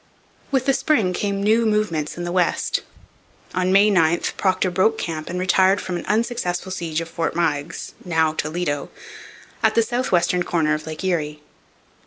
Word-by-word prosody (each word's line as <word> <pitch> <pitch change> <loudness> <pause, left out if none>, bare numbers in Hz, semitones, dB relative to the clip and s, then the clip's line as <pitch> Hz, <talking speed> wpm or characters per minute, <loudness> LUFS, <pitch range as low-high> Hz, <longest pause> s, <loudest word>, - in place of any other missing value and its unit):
With 265 -2 +1
the 275 - +3
spring 225 -11 +1
came 200 +1 -2
new 220 +3 +3
movements 210 -10 0
in 175 - -4
the 175 - -3
West. 180 -1 +1 0.7
On 185 0 +1
May 200 +2 +5
9 170 -3 +3 0.2
Procter 185 -1 +1
broke 200 +5 +2
camp 160 -5 -4
and 180 - -3
retired 190 +1 +3
from 180 - -4
an 175 - -5
unsuccessful 210 -5 -1
siege 170 -3 -2
of 165 - -6
Fort 165 0 -3
Meigs 165 -1 -2
(now 160 -3 +1
Toledo) 155 -2 -2 0.7
at - - +3
the 230 - +5
south 245 +3 -2
western 180 0 +2
corner 160 -4 +1
of 155 +1 -4
Lake 155 +3 -6
Erie. 150 -5 -2
180 Hz, 170 wpm, -22 LUFS, 165-200 Hz, 0.7 s, May